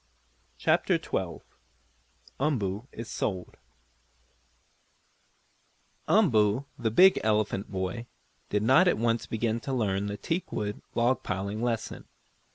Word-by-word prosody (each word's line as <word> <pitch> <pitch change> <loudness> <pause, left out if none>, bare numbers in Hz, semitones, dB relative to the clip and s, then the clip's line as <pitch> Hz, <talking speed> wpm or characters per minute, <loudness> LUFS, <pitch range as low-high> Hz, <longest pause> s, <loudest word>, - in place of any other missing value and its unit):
CHAPTER - - +2
XII - - -3 1.0
UMBOO 115 -6 -1
IS 115 0 -7
SOLD 95 -5 -3 2.5
Umboo, 125 - +3
the 115 -2 -1
big 185 - +6
elephant 105 -2 0
boy, 95 +5 -3 0.4
did 105 0 0
not 135 +11 +5
at - - +3
once 115 +1 0
begin 115 0 -1
to 115 - -5
learn 100 -5 0
the 100 0 -4
teakwood 105 - -3
log 120 +2 +2
piling 100 +2 -3
lesson. 120 -2 -3
110 Hz, 105 wpm, -28 LUFS, 105-125 Hz, 2.5 s, big